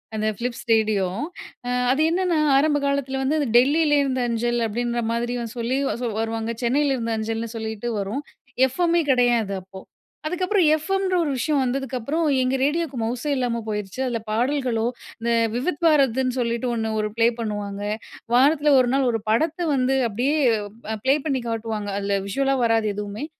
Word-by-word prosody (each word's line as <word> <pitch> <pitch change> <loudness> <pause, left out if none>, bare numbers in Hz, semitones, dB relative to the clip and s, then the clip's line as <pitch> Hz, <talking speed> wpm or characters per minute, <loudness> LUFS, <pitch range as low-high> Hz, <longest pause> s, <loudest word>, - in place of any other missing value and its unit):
அந்த 215 0 -1
Philips 240 0 -4
radio. 215 -3 +3 0.9
அது 285 +4 +1
என்னென்னா, 355 -1 +1 0.2
ஆரம்ப 290 +1 +3
காலத்தில 275 -1 -1
வந்து, 275 +4 +1
அந்த 285 - 0
"டெல்லில 295 +3 +4
இருந்த 260 -2 -1
அஞ்சல்" 240 +1 0
அப்டின்ற 235 +2 -1
மாதிரி 240 +1 -1 0.2
சொல்லி 240 +3 -1
வ - - 0
ச - - -1
வருவாங்க. 225 0 -2
"சென்னையில 275 +3 +2
இருந்த 230 -2 -3
அஞ்சல்"னு 225 +1 -3
சொல்லிட்டு 220 +1 -4
வரும். 205 +9 -3 0.5
எஃப்எம்மே 340 +5 +1
கிடையாது, 240 -5 +2
அப்போ. 190 +1 -12 0.5
அதுக்கப்புறம் 365 +1 +1
எஃப்எம்ன்ற 385 +3 -1
ஒரு 290 - -1
விஷயம் 285 +2 +1
வந்ததுக்கப்புறம், 270 +4 -2 0.2
எங்க 255 +1 +1
ரேடியோவுக்கு 295 -2 0
மவுஸே 250 +5 -2
இல்லாம 235 -2 -1
போயிருச்சு. 210 +3 -4
அதில 230 -3 -2
பாடல்களோ, 245 -1 0 0.4
இந்த 235 0 0 0.2
"விவித் 290 +6 -2
பாரதி"ன்னு 265 -4 +3
சொல்லிட்டு 235 +1 -1
ஒண்ணு 220 -1 -2
ஒரு 210 - -2
ப்ளே 230 0 +5
பண்ணுவாங்க. 205 -2 -4 0.5
வாரத்தில 290 +2 +4
ஒரு 245 -1 +2
நாள் 265 -2 +2
ஒரு 225 -2 -2
படத்த 315 +9 +1 0.2
வந்து 260 +1 +1
அப்படியே 255 +8 0 0.6
அ - - -7
பிளே 270 +2 +5
பண்ணி 265 -3 0
காட்டுவாங்க. 220 -2 -3
அதில 200 0 0
விஷுவலா 270 +6 +1
வராது, 225 -1 +2
எதுவுமே. 210 +6 -5
245 Hz, 155 wpm, -23 LUFS, 225-285 Hz, 0.9 s, ப்ளே